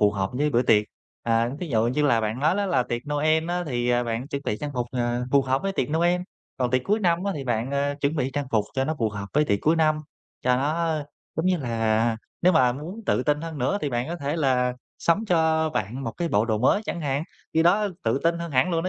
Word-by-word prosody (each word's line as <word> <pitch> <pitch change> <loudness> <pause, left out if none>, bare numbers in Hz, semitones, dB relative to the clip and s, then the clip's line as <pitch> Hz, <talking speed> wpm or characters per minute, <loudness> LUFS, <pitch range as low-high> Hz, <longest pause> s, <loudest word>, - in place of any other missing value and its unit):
phù 105 -1 +5
hợp 95 -2 -2
với 145 +4 0
bữa 120 -2 +3
tiệc. 105 -4 +4 0.4
À, 115 0 +1
thí 180 - -3
dụ 115 -4 +2
như 130 +5 0
là 120 -6 +3
bạn 110 +2 -2
nói 155 +7 +2
đó 205 - 0
là 175 -9 +2
tiệc 120 0 -4
Noel 155 +2 +2
á, 180 0 0
thì, 120 -3 -1
à, 120 0 +2
bạn 120 +4 -3
chuẩn 140 -3 -4
bị 105 - -1
trang 150 - -3
phục, 125 -1 -1
à, 120 -1 0
phù 140 -1 +5
hợp 130 +1 0
với 195 - -1
tiệc 130 -10 -1
Noel, 175 +3 +2 0.4
còn 125 -2 0
tiệc 130 0 +2
cuối 210 +2 +1
năm 175 -2 +1
á 200 - 0
thì 140 - -5
bạn, 120 0 -1
à, 140 0 0
chuẩn 145 +3 0
bị 135 -3 0
trang 145 -1 -2
phục 110 -2 +2
cho 135 - +1
nó 155 +3 -1
phù 115 - +1
hợp 100 -1 -6
với 150 +1 +3
tiệc 100 -8 +1
cuối 160 +2 +3
năm, 155 -1 +3 0.4
cho 125 0 +3
nó, 160 +4 0 0.4
giống 160 +3 0
như 185 -1 +3
là, 115 -3 +1 0.3
nếu 185 - +5
mà 125 -7 +4
muốn 160 - -7
tự - - +2
tin 150 +2 +1
hơn 165 -2 -6
nữa 130 +11 0
thì 145 - -2
bạn 120 +2 -1
có 170 - -3
thể 145 0 -2
là 130 -5 +2 0.3
sắm 185 +6 +2
cho 160 -3 +2
bạn 125 +1 -3
một 115 - -3
cái 170 +8 -2
bộ 105 -7 +2
đồ 110 -2 0
mới 130 - +3
chẳng 175 - -4
hạn, 140 -1 -1 0.3
khi 160 - +4
đó 205 +5 +3 0.2
tự 115 +3 +2
tin 170 0 +2
hơn 170 0 -5
hẳn 135 +8 +3
luôn 165 -1 0
đó - - 0
140 Hz, 270 wpm, -25 LUFS, 120-165 Hz, 0.4 s, phù